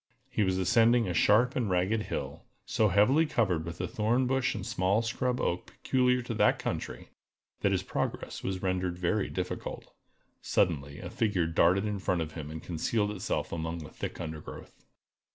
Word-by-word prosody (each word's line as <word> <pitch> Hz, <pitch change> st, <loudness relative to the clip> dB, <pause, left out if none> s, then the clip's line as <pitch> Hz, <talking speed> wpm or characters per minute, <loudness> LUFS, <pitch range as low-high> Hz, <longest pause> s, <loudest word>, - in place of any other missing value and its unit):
He -, -, 0 dB
was 95 Hz, -2 st, +2 dB
ascending 115 Hz, +5 st, +4 dB
a 90 Hz, -, -1 dB
sharp 120 Hz, +8 st, +4 dB
and 120 Hz, -5 st, 0 dB
ragged 95 Hz, +5 st, +1 dB
hill, -, -, -5 dB, 0.2 s
so 110 Hz, -, +2 dB
heavily 105 Hz, -, +4 dB
covered 95 Hz, -, +1 dB
with 85 Hz, +1 st, -6 dB
the 90 Hz, -, -2 dB
thorn 115 Hz, +7 st, +1 dB
bush 130 Hz, 0 st, +1 dB
and 100 Hz, -3 st, -5 dB
small 95 Hz, +5 st, +1 dB
scrub 125 Hz, +2 st, -1 dB
oak 90 Hz, -, -1 dB
peculiar 125 Hz, -1 st, +1 dB
to 120 Hz, -, -4 dB
that -, -, +3 dB
country, -, -, -4 dB, 0.5 s
that -, -, +2 dB
his -, -, +1 dB
progress -, -, -3 dB
was 95 Hz, -1 st, -3 dB
rendered 90 Hz, -1 st, -1 dB
very 95 Hz, +4 st, 0 dB
difficult. 90 Hz, -1 st, -5 dB, 0.5 s
Suddenly 70 Hz, -4 st, 0 dB
a 90 Hz, -1 st, -7 dB
figure 105 Hz, -8 st, +1 dB
darted 85 Hz, +4 st, +3 dB
in 105 Hz, -2 st, -2 dB
front 90 Hz, -2 st, 0 dB
of 80 Hz, -1 st, -3 dB
him 75 Hz, -2 st, -7 dB
and 80 Hz, +1 st, -7 dB
concealed 105 Hz, +5 st, 0 dB
itself 100 Hz, -3 st, -2 dB
among 80 Hz, 0 st, -3 dB
the 75 Hz, -, -10 dB
thick -, -, -6 dB
undergrowth. 80 Hz, -2 st, -7 dB
95 Hz, 175 wpm, -30 LUFS, 85-115 Hz, 0.5 s, ascending